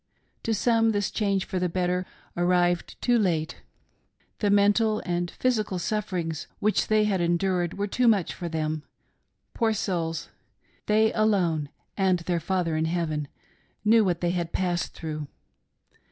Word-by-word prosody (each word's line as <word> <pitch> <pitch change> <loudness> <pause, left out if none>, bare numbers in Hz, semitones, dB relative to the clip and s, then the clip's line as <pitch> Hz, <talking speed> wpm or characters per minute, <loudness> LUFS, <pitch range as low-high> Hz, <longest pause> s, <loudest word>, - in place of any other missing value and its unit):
To 225 - -2
some 225 +1 +3
this 205 -1 0
change 200 -3 0
for 185 - -3
the 180 0 0
better 180 +1 -1 0.3
arrived 175 0 +1
too 245 -1 +3
late 165 -6 -1 0.4
— - - -42
the 205 - +1
mental 205 +2 +3
and 175 -1 -1
physical 215 -6 0
sufferings 175 -5 -2
which 215 +1 +1
they 215 -1 +3
had 200 -4 +1
endured 175 +1 0
were 200 - 0
too 240 +4 +1
much 205 -6 +3
for 175 - -5
them. 155 -1 -2 0.7
Poor 225 -2 +1
souls! 165 -5 -2 0.6
they 220 +1 +3
alone 180 -9 +1 0.3
and 190 -2 +2
their 170 0 -1
Father 170 -1 -1
in 160 +1 +1
heaven 160 -3 -1 0.6
knew 225 +1 +6
what 175 -4 0
they 175 -1 +1
had 175 -2 -2
passed 175 -2 -1
through. 155 -2 -5
180 Hz, 150 wpm, -26 LUFS, 170-210 Hz, 0.7 s, knew